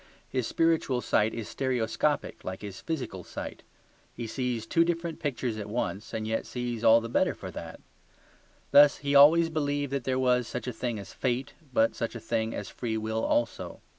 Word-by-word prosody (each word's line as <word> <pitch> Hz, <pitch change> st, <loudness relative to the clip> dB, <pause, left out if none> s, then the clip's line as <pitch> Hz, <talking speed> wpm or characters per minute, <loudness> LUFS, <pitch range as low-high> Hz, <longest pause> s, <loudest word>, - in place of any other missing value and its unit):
His 125 Hz, -3 st, -1 dB
spiritual 160 Hz, -6 st, +1 dB
sight 110 Hz, -1 st, +2 dB
is 115 Hz, -3 st, -5 dB
stereoscopic, 130 Hz, +4 st, -1 dB
like 95 Hz, +2 st, -6 dB
his 100 Hz, -2 st, -7 dB
physical 130 Hz, -, -4 dB
sight: -, -, -7 dB, 0.5 s
he 120 Hz, -, -4 dB
sees 120 Hz, -1 st, -2 dB
two 165 Hz, +8 st, +3 dB
different 170 Hz, -1 st, -2 dB
pictures 125 Hz, -6 st, -2 dB
at 105 Hz, -1 st, -5 dB
once 105 Hz, -2 st, -3 dB
and 110 Hz, -1 st, -3 dB
yet 110 Hz, 0 st, -1 dB
sees 120 Hz, -2 st, -4 dB
all 115 Hz, 0 st, +7 dB
the 115 Hz, -, -5 dB
better 115 Hz, -, +1 dB
for -, -, -8 dB
that. -, -, -8 dB, 0.9 s
Thus 145 Hz, 0 st, +8 dB
he 140 Hz, 0 st, -3 dB
has 140 Hz, -, +6 dB
always 165 Hz, +4 st, +7 dB
believed 145 Hz, -2 st, -1 dB
that 140 Hz, -2 st, -1 dB
there 130 Hz, +1 st, 0 dB
was 125 Hz, -2 st, +2 dB
such 125 Hz, -, -5 dB
a 125 Hz, -, -3 dB
thing 120 Hz, 0 st, -3 dB
as 100 Hz, -2 st, -9 dB
fate, 130 Hz, +1 st, -1 dB, 0.2 s
but 115 Hz, -2 st, +3 dB
such 115 Hz, +1 st, -3 dB
a -, -, -4 dB
thing 115 Hz, 0 st, -1 dB
as 100 Hz, -, -5 dB
free 115 Hz, -3 st, -3 dB
will 110 Hz, +1 st, -2 dB
also. 120 Hz, -2 st, -1 dB
125 Hz, 195 wpm, -28 LUFS, 110-140 Hz, 0.9 s, Thus